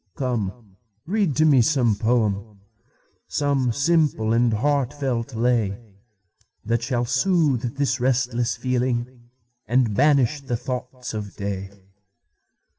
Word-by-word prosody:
Come, 110 -5 -4 0.3
read 190 -5 0
to 155 - +3
me 140 -5 +5
some 125 -4 +2
poem, 105 -2 -1 0.7
Some 140 -4 0
simple 140 -5 +1
and 120 0 +3
heartfelt 130 0 -1
lay, 115 -4 +1 0.9
That 115 +1 0
shall 120 0 -1
soothe 130 -3 +1
this 135 -4 0
restless 125 -1 0
feeling, 125 -1 -2 0.4
And 120 -2 +2
banish 140 +2 +3
the 125 -4 -3
thoughts 125 0 -6
of 105 -2 -6
day. 100 -1 -4
125 Hz, 110 wpm, -23 LUFS, 115-135 Hz, 0.9 s, me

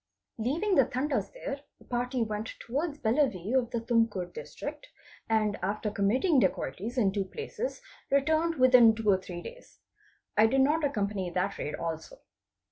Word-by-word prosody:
Leaving 315 - 0
the 275 -7 +5
Tandas 265 +2 -1
there, 285 - -5 0.2
a - - -17
party 245 0 -1
went 215 0 -3
towards 290 +5 -3
Bellave 225 - +1
of 255 -3 +2
the 235 -2 -2
Tumkur 225 -6 0
District, 480 +1 -7 0.4
and 215 -2 +1
after 205 +3 -2
committing 255 - +2
dacoities 230 +4 -2
in 205 -6 +3
two 195 -1 -1
places 450 - -5 0.3
returned 315 +4 +2
within 250 -4 +7
two 220 -1 -5
or 190 - +4
three 175 -2 -7
days. - - -11 0.6
I 215 +1 +6
did 265 +3 +3
not 300 +4 +3
accompany 205 -9 -1
that 180 +3 -2
raid 150 - -3
also. 165 - -5
235 Hz, 155 wpm, -29 LUFS, 205-285 Hz, 0.6 s, within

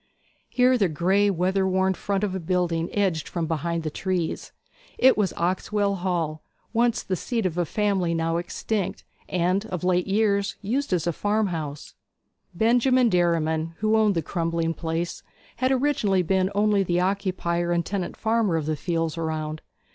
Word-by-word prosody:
Here 250 0 +3
the 195 -4 +3
grey, 190 +6 +2
weather 190 +1 +1
worn 190 0 +2
front 195 +2 -2
of 200 -3 -1
a 190 - -2
building 170 -1 0
edged 190 -6 0
from 170 -2 -2
behind 165 +1 -2
the 155 - -3
trees. 180 -1 -2 0.5
It 260 +1 +6
was 205 -4 +1
Oxwell 200 +3 0
Hall, 170 -4 -2 0.3
once 235 0 +2
the 185 - -1
seat 230 +3 -2
of 175 -3 -1
a 175 -1 0
family 190 -3 0
now 165 0 0
extinct, 190 +3 -3 0.3
and 180 +3 +1
of 180 -4 -5
late 180 0 +2
years 200 0 +1
used 255 +7 -2
as 175 -3 +1
a 170 - 0
farmhouse. 175 -8 -2 0.6
Benjamin 245 +4 +3
Derriman, 165 -3 +1
who 215 +1 +2
owned 215 -3 +3
the 165 - 0
crumbling 165 0 -1
place, 165 +1 -3 0.4
had 255 +2 +1
originally 250 -9 +2
been 190 +2 +1
only 205 -1 +3
the 175 -2 +1
occupier 180 -2 0
and 170 -1 +1
tenant 195 -3 -3
farmer 220 -5 +1
of 155 - -2
the 155 0 0
fields 165 0 -2
around. 155 -1 -3
185 Hz, 160 wpm, -25 LUFS, 165-205 Hz, 0.6 s, It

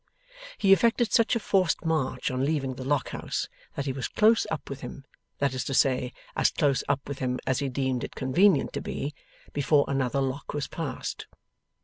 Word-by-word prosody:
He 195 -1 +6
effected 230 +3 +3
such 230 +1 +4
a - - +1
forced 185 -5 +1
march 150 -7 0
on 130 +1 -1
leaving 140 -3 0
the 130 - -7
Lock 140 0 0
House - - -3 0.3
that 140 - -2
he 135 - -1
was 130 -1 -3
close 220 +2 +4
up 160 - -4
with 140 -1 -6
him 135 +2 -8 0.3
that 140 -2 +1
is 130 - -2
to 135 - -2
say, 125 -2 +2 0.2
as - - +4
close 140 -5 +1
up 140 -1 0
with 140 -1 -5
him 125 -1 -1
as 130 - +1
he 140 - -1
deemed 130 -2 -1
it - - -6
convenient 145 +5 +3
to - - -3
be 145 +2 -4 0.4
before 145 0 +3
another 135 -1 0
Lock 135 +2 -3
was 145 - -1
passed. 160 -4 -5
140 Hz, 200 wpm, -27 LUFS, 130-160 Hz, 0.4 s, He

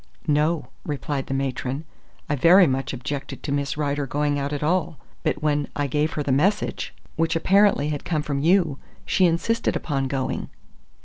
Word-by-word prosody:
"No," 155 +2 +1
replied 145 -2 -3
the - - -3
matron. 135 +2 -2 0.4
"I 145 - 0
very 175 +7 +7
much 135 -2 -1
objected 135 +2 -5
to 145 - -3
Miss 140 0 -1
Rider 145 -1 -1
going 145 +2 0
at 145 +1 -2
all, 160 -1 0 0.2
but 150 - -1
when 145 -1 +1
I 145 - 0
gave 150 +3 0
her 150 - -2
the 140 - -1
message, 185 +11 +1 0.3
which 165 +1 +1
apparently 195 -3 +4
had 145 -2 -3
come 155 -3 -1
from 140 -2 -2
you, 165 -2 +3 0.3
she 185 -2 +3
insisted 230 +8 0
upon 135 -3 -1
going." 130 -1 -2
145 Hz, 170 wpm, -24 LUFS, 140-165 Hz, 0.4 s, very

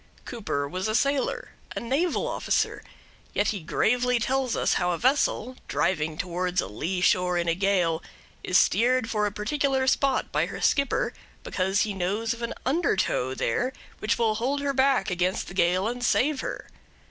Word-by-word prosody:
Cooper 200 - -3
was 185 +7 -3
a 215 - 0
sailor 280 - 0 0.3
a - - -1
naval 280 +9 0
officer; - - -1 0.5
yet 205 - +2
he 205 - -2
gravely 245 +9 +1
tells 255 +2 0
us - - +1
how 180 - +1
a 175 - 0
vessel, 255 - +1
driving 155 -3 0
towards 180 +1 -1
a - - +1
lee 170 - -3
shore 180 0 +3
in 170 0 -1
a 170 - +3
gale, 180 -3 +1 0.4
is 185 - +3
steered 240 +2 +3
for 210 -1 +1
a - - -3
particular 265 +5 0
spot 270 +1 +1
by - - +1
her - - -7
skipper 280 - +1 0.3
because 190 +2 0
he 210 - 0
knows 200 +5 -1
of 235 - -10
an 235 - -3
undertow 195 - +1
there 250 - -1 0.3
which 215 - 0
will 225 -2 +2
hold 255 +6 -1
her 280 -1 0
back 265 -7 +2
against 180 +1 0
the - - -8
gale 185 +2 +2
and 245 +1 -4
save 280 +3 +2
her. - - -5
215 Hz, 175 wpm, -26 LUFS, 180-255 Hz, 0.5 s, shore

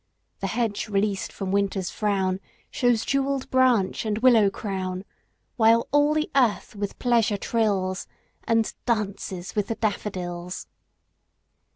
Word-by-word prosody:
The - - -2
hedge 225 -4 -1
released 200 -1 0
from 195 -2 -4
Winter's 195 -2 0
frown 195 -3 0 0.3
Shews 245 -3 +2
jewelled 275 -1 0
branch 255 -7 +3
and 215 -2 -1
willow 225 -4 +5
crown; 190 -2 -4 0.5
While 230 0 +4
all 290 +1 +4
the 310 0 0
earth 240 -6 +2
with 205 -1 -4
pleasure 230 -4 +2
trills, 195 -4 0 0.4
And 225 -1 +1
'dances 200 -5 -2
with 210 -2 0
the 225 - -2
daffodils. 180 -5 -3
210 Hz, 120 wpm, -25 LUFS, 195-235 Hz, 0.5 s, willow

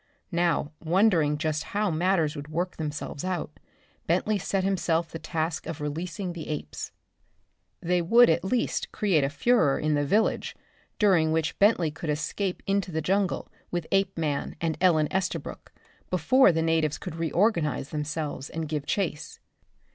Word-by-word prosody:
Now, 170 -4 +1
wondering 165 -4 +3
just 155 0 -1
how 210 -3 +2
matters 165 -2 +1
would 145 -1 -7
work 175 +4 -3
themselves 150 -2 -4
out, 180 -4 -3 0.5
Bentley 195 +5 +1
set 195 0 -1
himself 170 -4 0
the 165 - -6
task 160 +1 -3
of 165 - -5
releasing 170 +5 -4
the 165 -2 -7
apes. 75 0 -5 0.9
They 175 +1 +1
would 235 +8 +6
at 165 +1 +2
least 235 +5 -1
create 185 -9 +2
a 135 - +1
furor 150 - +3
in 155 0 0
the 145 0 +2
village, 210 +10 +1 0.4
during 180 -7 +4
which 160 0 -1
Bentley 195 -6 +4
could 160 +1 -6
escape 165 +6 -2
into 195 -1 0
the 160 0 -1
jungle 195 +1 0 0.2
with 175 -2 -2
Apeman 165 -7 0
and 165 -2 -1
Ellen 160 -5 +4
Estabrook 190 0 -3 0.4
before 185 - +5
the 165 -1 0
natives 160 -2 +1
could - - -7
reorganise 165 - +1
themselves 150 -2 -4
and 160 -1 -4
give 150 -1 -3
chase. 165 -5 -2
165 Hz, 150 wpm, -27 LUFS, 155-190 Hz, 0.9 s, would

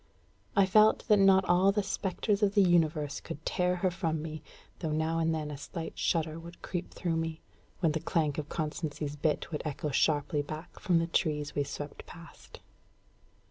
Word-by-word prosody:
I 200 -2 +6
felt 215 +3 +4
that 210 -1 +6
not 195 -1 +6
all 185 +3 +4
the 205 0 0
spectres 200 +2 -1
of 205 0 +2
the 200 - +6
universe 160 -5 +2
could 150 - -9
tear 180 0 +1
her 180 +1 0
from 165 -3 -1
me, 155 0 -6 0.4
though 160 - -2
now 160 +2 0
and 165 0 +2
then 155 -2 -2
a 145 - -6
slight 165 +2 -6
shudder 160 -1 0
would 170 +1 -12
creep 175 -1 -4
through 165 -2 -2
me, 160 -1 -3 0.4
when 165 -4 +3
the 160 - -1
clank 155 -3 0
of 150 - -5
Constancy's 150 -2 -3
bit 150 +3 -1
would 150 - -3
echo 150 -1 -3
sharply 145 +1 +2
back 155 +4 -8
from 175 -2 +2
the 165 - +2
trees 150 -4 -1
we 145 - +1
swept 145 +1 -7
past. 170 0 -13
165 Hz, 185 wpm, -30 LUFS, 150-180 Hz, 0.4 s, I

